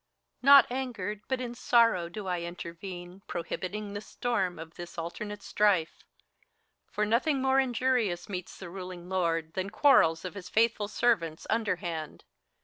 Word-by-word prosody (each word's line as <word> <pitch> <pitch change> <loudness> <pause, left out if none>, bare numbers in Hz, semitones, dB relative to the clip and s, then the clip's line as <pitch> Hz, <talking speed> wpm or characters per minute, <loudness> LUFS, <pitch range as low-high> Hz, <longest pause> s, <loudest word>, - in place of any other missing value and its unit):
HELENA. - - -10
Not 270 -3 +7
angered, 225 -6 -3
but 260 -1 -1
in 245 -2 -4
sorrow, 230 -8 +3
do 205 +3 -7
I 180 -2 -1
intervene, 175 +2 -7
Prohibiting 200 +4 -4
the 205 - -4
storm 210 -6 -2
of 160 +1 -9
this 175 0 -9
alternate 205 +5 -5
strife! 195 -6 +1 0.9
For 210 - 0
nothing 265 +7 +2
more 265 0 +3
injurious 245 -7 +1
meets 185 -3 -6
the 180 -3 -9
ruling 180 -1 -8
lord 165 -3 0
Than 190 +1 -2
quarrels 195 - +4
of 180 - -5
his 200 -3 -8
faithful 220 -2 +2
servants, 200 -8 0
imderhand. 175 -8 -2
195 Hz, 145 wpm, -29 LUFS, 175-230 Hz, 0.9 s, Not